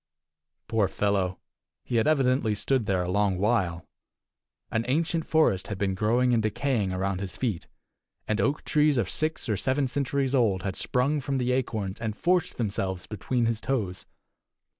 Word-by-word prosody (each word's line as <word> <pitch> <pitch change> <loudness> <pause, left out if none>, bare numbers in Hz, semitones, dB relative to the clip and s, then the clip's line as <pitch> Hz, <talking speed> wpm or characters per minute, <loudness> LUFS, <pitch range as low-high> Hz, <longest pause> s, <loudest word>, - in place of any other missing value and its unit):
Poor 110 -3 +2
fellow! 95 -3 0 0.5
He 120 - -1
had 110 - +2
evidently 130 -7 +2
stood 120 +1 0
there 95 -2 +1
a - - -4
long 100 -1 +2
while. 95 -5 0 0.9
An 115 - 0
ancient 160 +4 0
forest 155 - +2
had 105 - -4
been 95 -1 0
growing 120 +5 +2
and 115 - +3
decaying 110 -2 0
around 95 0 -1
his 95 -2 -6
feet, 110 -8 -2 0.6
and 110 0 +1
oak 145 +2 0
trees 150 -2 +3
of 115 -6 +1
six 155 -1 -2
or 110 - +1
seven 135 +6 +1
centuries 135 0 -1
old 105 -9 +2
had 95 -1 -2
sprung 140 +4 0
from 140 0 -2
the 125 -1 0
acorns, 110 -6 -2
and 110 -2 -3
forced 180 0 +1
themselves 95 -5 -2
between 115 +4 -1
his 115 -1 0
toes. 105 -9 -2
115 Hz, 165 wpm, -27 LUFS, 95-135 Hz, 0.9 s, and